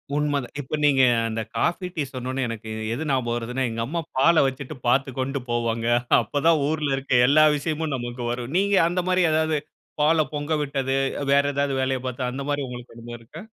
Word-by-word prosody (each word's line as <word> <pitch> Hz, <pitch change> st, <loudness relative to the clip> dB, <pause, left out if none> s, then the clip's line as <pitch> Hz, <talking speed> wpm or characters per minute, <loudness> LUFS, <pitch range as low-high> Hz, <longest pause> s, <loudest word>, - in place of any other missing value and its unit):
உண்ம 145 Hz, -1 st, +1 dB
தான் -, -, -12 dB
இப்ப 140 Hz, +3 st, -4 dB
நீங்க 135 Hz, -3 st, +5 dB, 0.3 s
அந்த 110 Hz, 0 st, -3 dB
காஃபி, 180 Hz, +2 st, 0 dB
டீ 155 Hz, -, 0 dB
சொன்னோன்ன, 130 Hz, +1 st, -3 dB
எனக்கு 110 Hz, -1 st, -6 dB, 0.2 s
எது 155 Hz, +5 st, -4 dB
ஞாபகம் 125 Hz, -3 st, 0 dB
வருதுன்னா. 125 Hz, +3 st, -2 dB
எங்க 115 Hz, 0 st, -3 dB
அம்மா 170 Hz, +6 st, -3 dB, 0.2 s
பால 160 Hz, +2 st, +5 dB
வெச்சுட்டு 135 Hz, +2 st, -4 dB
பார்த்துக்கோன்ட்டு 135 Hz, +1 st, 0 dB
போவாங்க. 115 Hz, -1 st, -1 dB, 0.3 s
அப்ப 140 Hz, +6 st, -3 dB
தான் 160 Hz, -3 st, +4 dB
ஊருல 150 Hz, -3 st, 0 dB
இருக்க 130 Hz, -2 st, +2 dB
எல்லா 155 Hz, +2 st, +6 dB
விஷயமும் 155 Hz, 0 st, -2 dB
நமக்கு 120 Hz, 0 st, -5 dB
வரும். 120 Hz, +4 st, -5 dB
நீங்க 200 Hz, +1 st, +2 dB
அந்த 180 Hz, +1 st, 0 dB
மாதிரி 185 Hz, 0 st, +3 dB
எதாவது, 155 Hz, 0 st, +1 dB, 0.4 s
பால 155 Hz, 0 st, +4 dB
பொங்க 145 Hz, +2 st, -2 dB
விட்டது, 135 Hz, -1 st, -1 dB, 0.3 s
வ் -, -, -4 dB
வேற 140 Hz, 0 st, +4 dB
எதாவது 140 Hz, -1 st, 0 dB
வேலைய 130 Hz, 0 st, 0 dB
பார்த்து 125 Hz, 0 st, -3 dB
அந்த 135 Hz, +2 st, -5 dB
மாதிரி 145 Hz, -1 st, -1 dB
உங்களுக்கு 125 Hz, -1 st, -9 dB
அனுபவம் 120 Hz, 0 st, -9 dB
இருக்கா? 150 Hz, -, -11 dB
135 Hz, 190 wpm, -24 LUFS, 125-150 Hz, 0.4 s, எல்லா